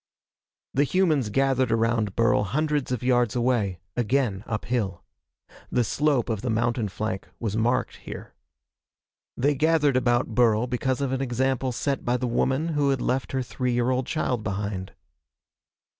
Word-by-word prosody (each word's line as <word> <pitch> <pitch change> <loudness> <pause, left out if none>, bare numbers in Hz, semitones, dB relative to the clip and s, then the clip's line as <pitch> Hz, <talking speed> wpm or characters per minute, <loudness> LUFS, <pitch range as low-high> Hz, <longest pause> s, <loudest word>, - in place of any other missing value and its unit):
The 140 - +3
humans 155 - +2
gathered 130 +1 +2
around 115 -3 +1
Burl 115 -2 +3
hundreds 150 +4 -1
of 125 0 -2
yards 125 -3 +2
away 115 -8 0
again 120 -4 0
uphill. 105 -4 -2 0.7
The 125 - +2
slope 145 0 +1
of 110 -4 -2
the 125 - -2
mountain 115 -1 0
flank 95 -2 -4
was 110 -3 -2
marked 115 +3 0
here. - - -9 1.0
They 140 +4 +2
gathered 150 -1 +2
about 120 -2 +1
Burl 115 -1 +3
because 130 +2 -1
of 135 -2 -1
an 135 0 -1
example 130 0 0
set 135 +2 -2
by 120 +1 +1
the 125 - -2
woman 130 +6 0
who 145 -3 +1
had 135 -1 +1
left 130 +2 -1
her 130 -1 0
three 125 0 -2
year 120 +1 +1
old 130 0 -1
child 125 -7 -1
behind. 95 -2 -3
125 Hz, 155 wpm, -25 LUFS, 115-135 Hz, 1.0 s, The